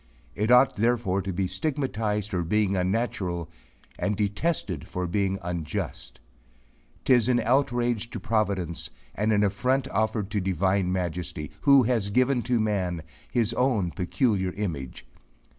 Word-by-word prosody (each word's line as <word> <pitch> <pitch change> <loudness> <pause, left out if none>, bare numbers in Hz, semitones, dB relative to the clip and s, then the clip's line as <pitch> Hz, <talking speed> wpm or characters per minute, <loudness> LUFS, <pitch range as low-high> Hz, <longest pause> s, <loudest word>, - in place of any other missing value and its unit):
It 105 - -1
ought 125 +2 +5
therefore 110 -4 +1
to 95 - -3
be 95 +1 -1
stigmatized 110 - -2
for 90 - 0
being 100 +3 +1
unnatural; 90 -4 -1 0.5
and 105 -1 0
detested 105 - -1
for 90 0 -3
being 95 +2 0
unjust. 85 -3 -4 0.9
Tis 125 -3 +4
an 120 -1 +3
outrage 120 -2 +1
to 115 - -6
providence 100 -6 -1 0.2
and 105 +2 0
an 105 -1 +3
affront 125 +7 +1
offered 110 -2 -1
to 105 - 0
divine 95 0 +1
Majesty, 90 -4 -3
who 140 -2 +6
has 115 -4 0
given 125 +4 +2
to 120 -2 +3
man 95 -6 -1 0.3
his 120 -2 +1
own 115 -9 +1
peculiar 95 - 0
image. 80 -14 -5
105 Hz, 135 wpm, -26 LUFS, 90-120 Hz, 0.9 s, who